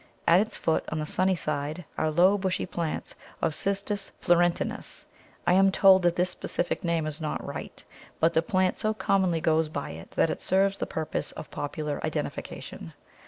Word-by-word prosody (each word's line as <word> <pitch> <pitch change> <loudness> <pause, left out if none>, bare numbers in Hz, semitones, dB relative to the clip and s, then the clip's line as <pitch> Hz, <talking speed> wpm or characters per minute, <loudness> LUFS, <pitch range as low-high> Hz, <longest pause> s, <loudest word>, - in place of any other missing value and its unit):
At 170 +2 +6
its 215 +1 -1
foot, 160 - +1
on 160 - -3
the 155 - -2
sunny 185 +4 +1
side, 150 +1 -3
are 155 - 0
low 180 +6 +5
bushy 190 -2 -1
plants 170 -3 -4 0.3
of 165 - 0
Cistus 200 +2 0
florentinus. 175 0 +1 0.4
I - - +4
am 195 +1 +5
told 190 -1 +6
that 175 -1 +2
this 180 +1 +1
specific 175 - -3
name 170 -2 0
is 155 +1 -5
not 155 - -3
right; - - -6 0.4
but 165 +1 +3
the 160 - +4
plant 185 0 +1
so 215 0 0
commonly 185 -6 +1
goes 160 -1 +2
by 145 -2 -4
it 80 +1 -10
that 165 - +3
it - - -5
serves 195 +1 +2
the - - -2
purpose 160 -1 -3
of - - -9
popular 145 0 -4
identification. 80 - -5
175 Hz, 180 wpm, -27 LUFS, 155-190 Hz, 0.4 s, At